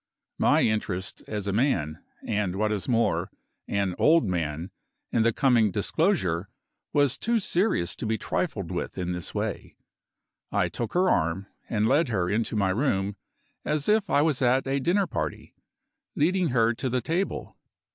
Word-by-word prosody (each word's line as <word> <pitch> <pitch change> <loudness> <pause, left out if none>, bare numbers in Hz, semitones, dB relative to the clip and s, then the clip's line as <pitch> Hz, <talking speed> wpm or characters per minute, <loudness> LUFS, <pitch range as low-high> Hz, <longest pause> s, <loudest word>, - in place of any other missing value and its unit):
My - - +4
interest 100 -4 -1
as 105 -2 -3
a 100 - -1
man 90 - 0 0.2
(and, 105 -4 -1
what 110 +2 0
is 105 +1 -2
more, 115 -1 +1 0.4
an 100 -2 0
old 165 -2 +5
man) 85 -1 -2 0.4
in 115 - +2
the 115 +1 +4
coming 120 -4 +3
disclosure 105 - 0 0.4
was 145 -3 +2
too 235 +1 +1
serious 185 - 0
to - - -4
be 110 0 0
trifled 110 - -2
with 90 +1 -4
in 90 -1 -2
this 90 -1 -5
way. - - -3 0.8
I - - +1
took 115 -3 -4
her 185 +1 +3
arm, 85 - +1 0.2
and 110 -1 +1
led 155 +6 +3
her 95 -7 0
into 115 +1 0
my 100 -3 +2
room 100 -4 0 0.5
as 150 -1 -1
if 210 -1 +3
I 145 - +4
was 155 -4 +1
at 130 +1 +3
a 135 +1 0
dinner 185 +8 +2
party, 75 - -4 0.6
leading 180 +4 +2
her 115 -2 +3
to 130 +3 -3
the 125 0 0
table. 170 - -2
110 Hz, 165 wpm, -26 LUFS, 95-145 Hz, 0.8 s, old